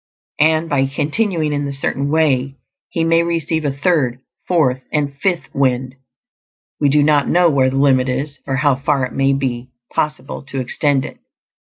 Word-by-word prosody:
And 160 +2 +3
by 135 -3 +1
continuing 155 +3 -1
in 145 0 -1
the 140 - -3
Certain 140 0 -2
Way, 140 -4 +1 0.3
he 165 - -1
may 165 0 +3
receive 165 -2 -1
a 145 - +1
third, 140 -4 0 0.3
fourth, 135 -8 +2
and 145 -2 -1
fifth 175 -6 -1
"wind"; 130 -1 0 0.9
we 145 - +3
do 145 +1 +4
not 145 -1 +3
know 175 -1 +4
where 130 -2 +3
the 130 - -4
limit 135 -2 +3
is, 135 +2 -3
or 135 - 0
how 140 +1 +3
far 140 -1 0
it 125 - -8
may 135 0 +2
be 130 -2 -3 0.2
possible 150 0 -2
to 135 - -4
extend 135 +2 0
it. - - -10
145 Hz, 175 wpm, -18 LUFS, 135-155 Hz, 0.9 s, do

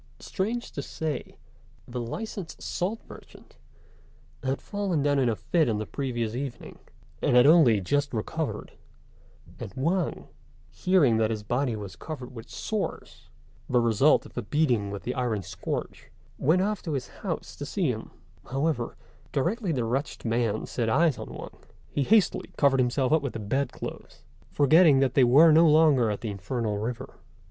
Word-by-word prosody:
Strange 225 +5 -3
to 140 - -4
say, 150 -1 -5 0.5
the 120 0 -4
licensed 185 - -6
salt 200 +6 -3
merchant - - -15 0.9
had 135 +1 -1
fallen 195 -8 -2
down 145 -1 +2
in 125 -3 +2
a 115 - 0
fit 160 +4 +1
on 110 - 0
the 110 - -3
previous 120 -4 -3
evening, 130 -1 -6 0.4
and - - +2
had 125 +1 +7
only 145 -9 +6
just 140 +9 0
recovered; 150 +8 -3 0.9
and - - -6
Wang, 165 +6 -1 0.4
hearing 165 -11 +3
that 110 -1 +2
his 110 -2 -3
body 120 +2 0
was 100 -3 -7
covered 130 -5 -8
with 115 -2 -10
sores - - -5 0.4
the 125 - +3
result 120 +5 +3
of - - -13
the - - -3
beating 125 -10 +1
with 100 0 -6
the 125 - -2
iron 120 -6 -1
scourge 95 +2 -5 0.3
went 170 +7 +3
off 210 0 -1
to 160 - -4
his 130 -3 -3
house - - -4
to - - -7
see - - 0
him; - - -6 0.4
however, 135 -2 -1 0.3
directly 185 - 0
the 125 -6 -1
wretched 135 +5 -3
man 115 -2 0
set 115 -3 -2
eyes 155 +3 +3
on - - -7
Wang, - - -9 0.3
he 145 - -1
hastily 205 +5 +2
covered 140 -2 +4
himself 130 +2 +1
up 160 - +4
with 140 -3 -4
the - - -4
bed 130 +7 -1
clothes, - - -9 0.3
forgetting 150 +1 +5
that 135 -2 +2
they 135 - +5
were 145 +7 +7
no 160 +1 +6
longer 150 -7 +5
at 105 - -3
the 110 - -3
infernal 105 +1 -3
river. 125 +4 -5
135 Hz, 170 wpm, -27 LUFS, 115-160 Hz, 0.9 s, had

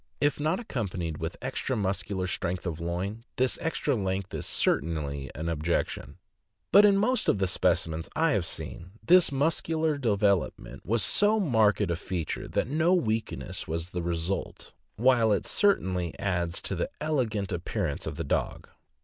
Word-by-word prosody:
If 145 +1 +1
not 155 +5 +1
accompanied 95 - -3
with 80 +1 -4
extra 130 0 -2
muscular 95 -1 -1
strength 90 0 -2
of 85 -2 -3
loin, 90 +7 -3
this 130 0 0
extra 160 -4 0
length 95 -2 -2
is - - -3
certainly 70 -3 0
an 80 - -4
objection; 85 +1 -2 0.5
but 205 - +8
in 200 -1 +5
most 240 +4 +1
of - - +3
the 95 - +1
specimens 85 -3 0
I 165 0 +3
have 100 - +1
seen, 80 +4 -7
this 180 -3 +6
muscular 155 +1 0
development 100 - 0
was 115 +2 +2
so 210 +2 +3
marked 110 - +3
a 85 - +1
feature 85 -2 -4
that - - -1
no 160 +6 +3
weakness 110 - -2
was 80 +2 -3
the 90 - -3
result, 85 +2 -3 0.2
while 120 -1 +4
it 100 - +1
certainly 90 - +1
adds 90 -3 -1
to - - -2
the - - -2
elegant 110 -10 -1
appearance 85 -2 -2
of - - -4
the - - -3
dog. - - -2
100 Hz, 160 wpm, -28 LUFS, 85-140 Hz, 0.5 s, but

